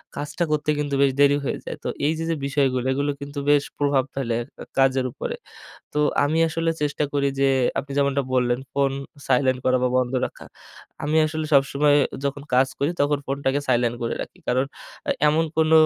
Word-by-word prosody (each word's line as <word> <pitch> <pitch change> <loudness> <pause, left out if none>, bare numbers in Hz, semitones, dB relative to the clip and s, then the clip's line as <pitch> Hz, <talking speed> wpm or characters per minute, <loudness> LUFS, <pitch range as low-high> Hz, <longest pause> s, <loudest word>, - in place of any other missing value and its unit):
কাজটা 150 +4 -3
করতে 150 0 0
কিন্তু 145 -1 -2
বেশ 140 -1 +4
দেরি 145 0 +6
হয়ে - - -1
যায়। - - -5
তো - - -3 0.2
এই 155 - +3
যে, - - -2
যে 165 - +1
বিষয়গুলো 135 -2 +1
এগুলো 140 +2 0
কিন্তু 140 0 -5
বেশ 145 -1 +5 0.2
প্রভাব 140 -2 +2
ফেলে 120 -4 -1 0.2
ক - - -24 0.2
কাজের 135 -1 +3
উপরে। - - -4 0.6
তো - - -3 0.3
আমি 150 +3 +1
আসলে 165 +1 -1
চেষ্টা 150 0 0
করি 140 -1 +2
যে 135 - +4 0.3
আপনি 140 +1 -8
যেমনটা 140 0 +2
বললেন, 125 -1 +2
ফোন 140 -1 +2 0.4
সাইলেন্ট 130 0 +2
করা 130 0 +4
বা 125 - +2
বন্ধ 125 0 0
রাখা। - - -9 0.6
আমি 150 +2 0
আসলে 155 0 -3
সবসময় 140 +1 +4 0.3
যখন 140 0 -2
কাজ 130 +1 +4
করি, 145 +4 +1
তখন 145 0 +2
ফোনটাকে 135 0 0
সাইলেন্ট 120 -1 +2
করে 115 - -1
রাখি। - - -8
কারণ 130 +2 +2 0.4
এ - - +4 0.2
এমন 160 +2 +2
কোন 160 0 +3
140 Hz, 190 wpm, -23 LUFS, 130-145 Hz, 0.6 s, দেরি